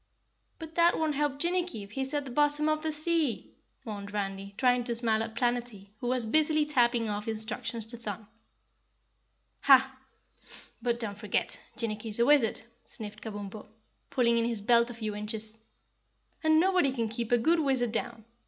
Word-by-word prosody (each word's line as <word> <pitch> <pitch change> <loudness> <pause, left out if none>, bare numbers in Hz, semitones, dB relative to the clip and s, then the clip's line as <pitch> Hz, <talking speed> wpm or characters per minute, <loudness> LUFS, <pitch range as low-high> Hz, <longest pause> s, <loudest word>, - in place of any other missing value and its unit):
"But 320 -1 -9
that 340 0 +4
won't 315 -1 0
help 290 -1 0
Jinnicky 345 - -1
if 200 - -13
he's 265 +2 -2
at 290 -1 -1
the 260 - -7
bottom 295 +3 +2
of 310 0 +1
the 315 0 -1
sea," 310 -4 0 0.3
mourned 205 -2 -6
Randy, 195 -1 -4
trying 250 -1 +3
to 240 -1 -2
smile 225 -2 +1
at 225 0 -4
Planetty, 240 -5 -2
who 245 - -4
was 250 -1 +2
busily 305 +5 +3
tapping 240 -5 +2
off 210 0 -3
instructions 225 +1 -2
to 235 +2 -3
Thun. 220 -2 -6 1.3
"Hah! 265 -1 +5 0.9
but 235 0 0
don't 205 -3 -3
forget, - - -1
Jinnicky's 220 -2 -2
a 235 - +5
wizard," 275 -5 +4 0.2
sniffed 215 -1 -7
Kabumpo, 205 -1 -7 0.4
pulling 235 -3 +2
in 230 - +1
his 230 -3 -2
belt 235 +2 +4
a 240 - -7
few 215 -2 -4
inches, 215 +1 -4 0.8
"and 315 0 +5
nobody 360 -5 +3
can 235 -4 -1
keep 230 +1 -4
a 240 - +6
good 325 +8 +3
wizard 260 -6 +2
down. 230 -1 -3
235 Hz, 170 wpm, -29 LUFS, 220-285 Hz, 1.3 s, a